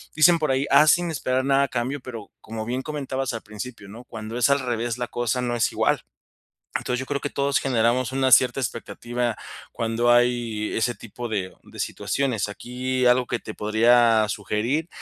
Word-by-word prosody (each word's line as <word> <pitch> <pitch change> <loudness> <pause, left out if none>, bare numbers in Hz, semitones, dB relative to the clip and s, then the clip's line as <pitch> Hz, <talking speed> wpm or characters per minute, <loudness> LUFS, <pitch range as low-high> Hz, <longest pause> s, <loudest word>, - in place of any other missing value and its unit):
dicen 170 +2 +6
por 155 -3 +1
ahí: 130 +1 +1
"Haz, 150 0 +7
sin 175 -1 +1
esperar 130 -3 -1
nada 140 0 +3
a - - 0
cambio". 130 +3 -2
Pero 115 -5 -8
como 110 0 -6
bien 125 +3 -2
comentabas 135 -3 -3
al 115 - -4
principio, 105 0 -8
¿no? 115 +5 -11
Cuando 110 0 -7
es 125 - +3
al 140 0 +4
revés, 120 -2 -2
la 125 -1 -3
cosa 120 +1 -1
no 120 -1 -1
es 120 - +1
igual. - - +1 0.7
Entonces, 125 0 -1
yo 130 - -4
creo 145 -1 -1
que 145 - -4
todos 140 0 +1
generamos 125 0 +1
una 130 -1 +1
cierta 125 +2 +5
expectativa 120 -1 -3 0.4
cuando 115 +1 +1
hay 120 -3 +1
ese 120 +2 +1
tipo 120 +2 -7
de, 100 -5 -3
de - - -14
situaciones. 125 -8 -1
Aquí 125 +4 -3
algo 125 +1 +4
que 120 - -2
te 110 - -8
podría 115 +1 +4
sugerir, 110 - -1
120 Hz, 190 wpm, -24 LUFS, 115-130 Hz, 0.7 s, Haz